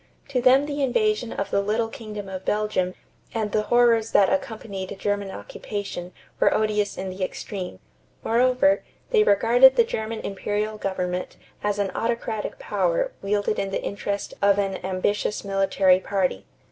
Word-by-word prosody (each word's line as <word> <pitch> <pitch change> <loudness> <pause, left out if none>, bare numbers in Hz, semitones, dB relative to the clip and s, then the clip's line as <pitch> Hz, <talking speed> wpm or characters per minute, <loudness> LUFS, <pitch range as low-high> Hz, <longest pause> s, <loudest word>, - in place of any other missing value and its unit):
To 255 -3 0
them 260 +3 +5
the 290 -1 -3
invasion 280 - +1
of 200 - -3
the 200 - +2
little 220 +3 0
kingdom 210 -3 -7
of 190 -1 -6
Belgium 210 -4 0 0.4
and 215 -2 -1
the 215 - +2
horrors 230 0 +3
that 200 +6 +5
accompanied 200 -7 -4
German 205 0 -1
occupation 180 - -6 0.3
were - - +4
odious 210 -1 0
in 190 0 -4
the 185 +1 -4
extreme. 185 - -5 0.5
Moreover, 255 +5 +3 0.3
they 445 - +5
regarded 240 - +6
the 470 - +6
German 220 - -4
imperial 210 +2 -3
government 180 -2 -3 0.3
as 205 -1 0
an 200 -2 0
autocratic 230 -2 -2
power - - 0
wielded 205 +1 0
in 195 - -1
the 195 - -3
interest 200 0 -3
of 200 0 +4
an 195 -2 -1
ambitious 190 +3 -1
military 195 -1 +3
party. 185 - -1
210 Hz, 150 wpm, -24 LUFS, 195-235 Hz, 0.5 s, regarded